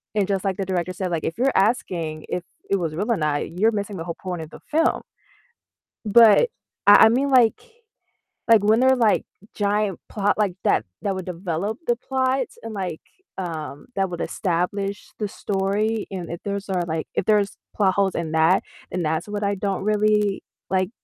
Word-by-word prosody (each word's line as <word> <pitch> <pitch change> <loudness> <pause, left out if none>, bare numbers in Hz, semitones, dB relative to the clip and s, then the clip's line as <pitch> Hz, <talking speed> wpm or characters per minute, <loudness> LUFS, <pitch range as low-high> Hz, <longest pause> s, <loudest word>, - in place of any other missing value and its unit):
and 205 -2 +2
just 195 -1 -1
like 190 -1 0
the 195 - -2
director 185 -1 -1
said, 185 0 -3
like, 165 -2 -1
if 165 +5 -3
you're 265 +2 +2
asking 175 -7 0
if 180 - -2 0.3
it 195 - +3
was 165 -4 -2
real 210 +7 -1
or 220 - +2
not, 150 -1 -1
you're 225 +2 +4
missing 205 -1 -3
the 165 - -4
whole 170 - -4
point 180 -3 -4
of 160 - -8
the - - -12
film. 325 +2 +2 1.0
But 230 - +6 0.4
I 205 +2 +9
I - - +8
mean, 270 +4 +1
like 245 -4 +5 0.9
like, 225 -3 +6
when 220 +3 +4
there 260 +1 +5
are, - - +4
like, 230 -4 +2 0.3
giant 205 -2 0
plot 205 0 0
like 205 -4 +1
that 110 - +3 0.2
that 195 -2 -1
would 185 - -5
develop 180 - -3
the 240 - +3
plot 260 +1 0 0.2
and 225 -1 -6
like, 180 -5 -4 0.4
um, 155 -5 -5
that 195 -1 +1
would 175 - -5
establish 195 +2 -2
the 210 - -1
story, 205 +3 -1
and 180 -3 -5
if 170 - -5
there's 200 0 -3
are, 180 -2 0
like 160 -1 -3
If - - 0
there's 210 -2 +2 0.2
plot 190 -3 +2
holes 195 -1 +2
in 160 -2 -3
that, 160 +4 +4 0.3
then 180 - -2
that's 160 +4 -1
what 205 0 -3
I 200 0 +1
don't 195 0 -2
really 210 -1 +2 0.3
like, 185 0 +1
195 Hz, 195 wpm, -23 LUFS, 180-215 Hz, 1.0 s, I